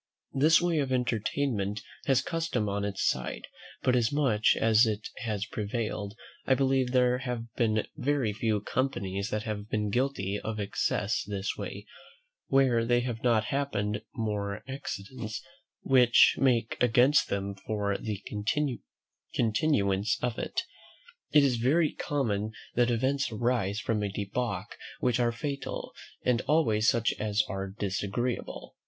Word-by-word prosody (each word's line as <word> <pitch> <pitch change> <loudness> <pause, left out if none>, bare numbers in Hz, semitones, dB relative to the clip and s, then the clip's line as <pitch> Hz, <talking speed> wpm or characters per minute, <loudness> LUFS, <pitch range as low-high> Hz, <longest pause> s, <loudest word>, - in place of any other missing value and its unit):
This 155 +5 +5
way 175 -2 +1
of 135 -2 -1
entertainment 110 -3 -1 0.2
has 135 -3 +3
custom 165 -10 -1
on 100 0 -1
its 100 -1 -1
side; 65 -1 -2 0.4
but 125 - +3
as 120 -2 +2
much 130 -8 +3
as 115 +1 +5
it 105 -1 -3
has 105 -4 -2
prevailed, 105 -2 -3 0.3
I 130 - +5
believe 135 -1 +2
there 125 -1 +3
have 120 -3 -5
been 110 -2 +1
very 140 -6 0
few 110 -1 0
companies 100 -6 -2
that 105 0 -2
have 105 -2 -5
been 105 -1 -1
guilty 115 -5 0
of 110 -1 -4
excess 100 -1 0
this 100 -1 -3
way, - - -6 0.6
where 130 -4 +3
there 120 +1 +2
have 120 -2 -4
not 115 -3 +3
happened 105 -7 -1
more 105 -3 -2
accidents 115 -4 -5 0.4
which 125 -3 +6
make 120 -4 +1
against 125 +4 +4
than 100 0 -2
for 100 0 -2
the 105 -2 -4 1.1
continuance 105 -4 +2
of 120 -2 -1
it. 370 - -2 0.7
It 150 - +6
is 130 -4 +2
very 150 +7 +3
common 110 -7 -1 0.2
that 120 0 +3
events 130 +4 +1
arise 110 -3 0
from 110 -2 -1
a 105 - -1
debauch 100 0 -3 0.2
which 125 -1 +1
are 120 -1 +3
fatal, 140 +3 -5 0.3
and 125 -1 +3
always 115 -9 +3
such 115 -1 +2
as 105 0 +1
are 95 -1 -3
disagreeable. 100 +4 -3
115 Hz, 140 wpm, -29 LUFS, 105-130 Hz, 1.1 s, which